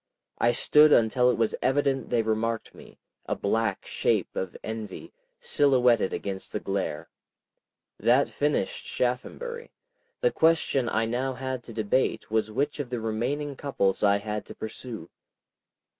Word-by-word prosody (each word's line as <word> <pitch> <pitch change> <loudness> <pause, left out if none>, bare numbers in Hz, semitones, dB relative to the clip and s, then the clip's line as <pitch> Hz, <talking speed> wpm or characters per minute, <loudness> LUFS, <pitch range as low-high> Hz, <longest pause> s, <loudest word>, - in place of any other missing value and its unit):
I 120 - +4
stood 150 +5 +5
until 125 +1 +4
it - - +1
was 115 -2 +1
evident 135 -1 +1
they 120 -2 +2
remarked 110 +1 -1
me, - - -15 0.3
a - - 0
black 110 0 -1
shape - - 0
of 95 -1 -4
envy, 110 -3 -6 0.3
silhouetted 125 -7 +3
against 95 -1 -5
the - - -2
glare. 95 -6 -3 0.9
That 125 +4 +4
finished 145 -9 -1
Shaphambury. 470 - -3 0.5
The - - +3
question 160 -6 +2
I 110 +1 +1
now 125 +3 -1
had 130 0 -4
to - - -9
debate 110 +2 0
was 110 -1 +1
which 145 +7 -1
of 140 -4 -3
the 125 -1 -2
remaining 125 +7 -2
couples 115 -9 0
I 100 -1 +4
had 105 +1 -4
to - - -10
pursue. 110 -4 -7
120 Hz, 145 wpm, -27 LUFS, 110-135 Hz, 0.9 s, stood